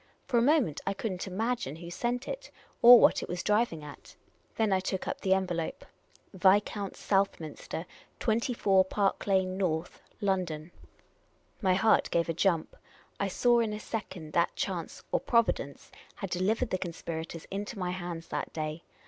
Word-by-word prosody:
For 240 -3 +2
a - - +3
moment, 250 - +2
I - - 0
could 215 +2 -3
n't 185 +1 -5
imagine 215 - -2
who 170 +1 -9
sent 245 +7 -2
it, - - -6 0.3
or 240 0 +11
what - - +5
it - - -6
was 175 0 -3
driving 210 -7 +1
at. 145 -1 -12 0.4
Then 220 -3 +2
I 190 - +3
took 185 0 -3
up - - -3
the 190 -1 +3
envelope. 175 -4 -3 0.3
" - - -31
Viscount 195 +1 +2
Southminster, 175 -4 -1 0.3
24 220 -4 +2
Park 195 +1 0
lyane 190 -1 +2
North, 170 -3 -2 0.2
L,ondon." 180 -6 -1 0.9
My 185 -2 +3
heart 220 +4 +3
gave 170 0 +1
a - - +1
jump. 170 -1 +1 0.4
I 200 - +1
saw 240 +5 +3
in 225 -2 0
a 210 - -4
second 190 -9 -6
that 170 - +2
chance, 180 -5 -4
or - - +2
Providence, 230 - 0 0.2
had 195 -3 -6
delivered 215 +7 0
the 185 - 0
conspirators 165 -2 -5
into 205 +3 -4
my 180 -2 -2
hands 175 -2 -6
that - - -3
day. 155 0 -4
190 Hz, 165 wpm, -30 LUFS, 170-215 Hz, 0.9 s, or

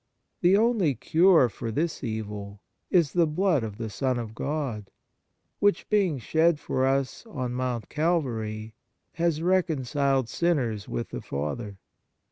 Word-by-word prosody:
The 185 +3 +5
only 215 - +2
cure 165 - +5
for 115 0 -6
this 155 +7 -2
evil 105 -3 -5 0.3
is 170 -7 +3
the 170 -2 +3
blood 160 -3 +1
of 105 -2 -5
the 115 - -4
Son 130 +5 0
of 115 -2 -5
God, 125 -7 -3 0.7
which, 205 0 +2
being 195 -8 +2
shed 160 +6 +2
for 130 -2 0
us 135 0 0
on 130 - -4
Mount 125 -2 -2
Calvary, 115 -10 -1 0.4
has 165 -2 0
reconciled 140 -7 +1
sinners 125 -11 0
with - - -3
the - - -6
Father. 95 +9 -4
135 Hz, 135 wpm, -27 LUFS, 110-170 Hz, 0.7 s, The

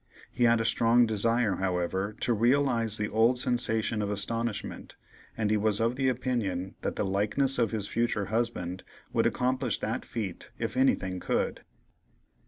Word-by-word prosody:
He 125 - +1
had 115 0 +4
a 115 - -1
strong 115 +2 +4
desire, 110 -2 +1
however, 95 +2 -2
to 120 - +1
realize 115 -1 +2
the 105 - -1
old 115 +4 +3
sensation 115 -3 +1
of 100 - -2
astonishment, 105 +2 -3 0.4
and 105 -2 0
he 110 - +3
was 105 0 +1
of 115 +2 +1
the 135 0 +1
opinion 115 -8 -2
that - - -3
the - - -1
"likeness 105 +8 +2
of 115 -3 +2
his 105 -1 -3
future 115 -3 -1
husband" 95 -6 -2 0.3
would - - +3
accomplish 130 -1 0
that 110 - -3
feat 110 -7 -5
if - - -3
anything 95 -8 +1
could. - - -1
115 Hz, 160 wpm, -28 LUFS, 100-120 Hz, 0.4 s, had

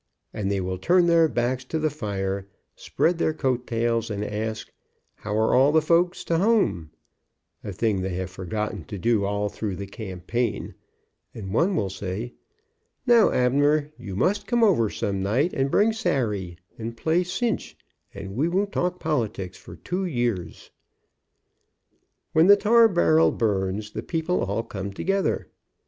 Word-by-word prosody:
and 100 -1 -2
they 100 - 0
will 95 0 -3
turn 175 - +4
their 170 -1 +5
backs 125 0 -1
to 145 +5 -3
the 155 -1 0
fire, 100 -7 -3 0.3
spread 170 0 0
their 160 -2 +1
coat 125 -4 -1
tails 115 -1 0
and 105 -1 -3
ask, 110 +1 -4 0.5
"how 105 0 -3
are 110 0 +2
all 135 +3 +5
the 160 - +5
folks 170 +3 +1
to 165 -1 0
hum," 195 - +2 0.7
a 100 - -5
thing 100 0 0
they 95 -1 -3
have 95 0 -4
forgotten 95 +1 -4
to 100 - -7
do 110 +1 +1
all 100 +1 -1
through 100 -1 -4
the 100 - -6
campaign, 100 +3 -4 0.6
and 95 -4 -6
one 180 - +2
will 100 - 0
say, 100 +6 -5 0.7
"Now, 235 -3 +6
Abner, 145 +4 +2
you 105 -6 -8
must 205 - 0
come 240 -1 +2
over 160 - +4
some 100 -1 -2
night 125 - +1
and 135 0 0
bring 215 +8 +3
Sary, 110 - -1 0.2
and 115 +1 -5
play 165 +7 +1
cinch, 215 +6 -2 0.3
and 95 0 -8
we 145 +7 +1
won't 195 +3 0
talk 180 0 -1
politics 110 - -2
for 85 - -12
two 180 - -3
years.'' 120 - -3 1.6
When 160 +2 +5
the 205 0 +8
tar 230 +3 +5
barrel 165 -5 +4
burns 105 -1 -1
the 110 - -4
people 165 +6 -1
all 100 +4 -2
come 100 -3 -6
together. 195 - -1
120 Hz, 160 wpm, -25 LUFS, 100-165 Hz, 1.6 s, the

